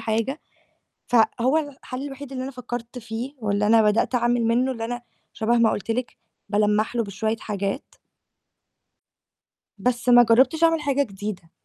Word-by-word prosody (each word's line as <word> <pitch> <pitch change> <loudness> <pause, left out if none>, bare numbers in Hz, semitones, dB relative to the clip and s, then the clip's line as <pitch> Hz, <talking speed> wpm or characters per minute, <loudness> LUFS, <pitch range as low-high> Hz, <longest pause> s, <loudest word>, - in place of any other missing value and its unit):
حاجة، 225 +6 -1 0.7
فهو 245 +4 +3
الحَل 275 -3 -5
الوحيد 280 -1 -8
اللي 255 -1 -4
أنا 270 - -5
فكّرت 245 -1 -6
فيه 235 +4 -6
واللي 210 -1 0
أنا 225 0 +6
بدأت 210 +4 +2
أعمل 240 -1 +2
منّه 245 +3 +2
اللي 230 -3 -4
أنا 245 +1 -4 0.3
شَبه 235 +1 +1
ما 230 -1 +4
قُلت 205 - -3
لِك، 245 +1 -3 0.3
بالمّح 210 +2 +1
له 230 - +1
بشوية 215 +3 -2
حاجات. 200 +3 -3 1.9
بس 245 +4 0
ما 245 0 +8
جرّبتش 260 +8 +3
أعمل 330 -1 +4
حاجة 280 -1 +1
جديدة. 195 -5 -7
235 Hz, 150 wpm, -24 LUFS, 220-255 Hz, 1.9 s, ما